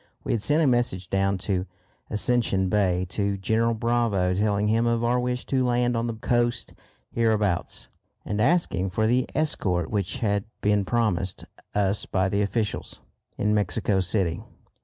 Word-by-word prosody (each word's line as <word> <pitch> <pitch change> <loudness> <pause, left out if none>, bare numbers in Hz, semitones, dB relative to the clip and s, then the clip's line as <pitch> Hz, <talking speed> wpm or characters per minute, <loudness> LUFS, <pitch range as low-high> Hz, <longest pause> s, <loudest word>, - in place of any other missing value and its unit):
We - - -2
had 115 - 0
sent 150 +7 +3
a - - +3
message 120 -9 +1
down 95 0 +1
to 95 -2 -1 0.4
Ascension 105 -4 +1
Bay 95 -3 +1
to 100 +1 -1
General 115 +4 +1
Bravo 115 -5 +1
telling 105 +1 +1
him 115 +2 +2
of 115 0 +1
our 120 +1 +2
wish 125 0 -2
to 130 -1 +1
land 120 0 +1
on 115 +1 -1
the 115 - -3
coast 120 +1 0 0.4
hereabouts, 105 -6 0 0.4
and 105 0 -1
asking 115 - +1
for 110 +4 0
the 125 +3 +2
escort 95 - 0
which 100 +2 -1
had 105 -4 0 0.2
been 105 -1 +2
promised 95 -6 -1 0.3
us 100 0 +1
by 95 0 +1
the 100 +1 0
officials 105 +1 -2 0.4
in 105 +1 +1
Mexico 100 -1 +1
City. 95 -1 0
105 Hz, 160 wpm, -25 LUFS, 95-120 Hz, 0.4 s, sent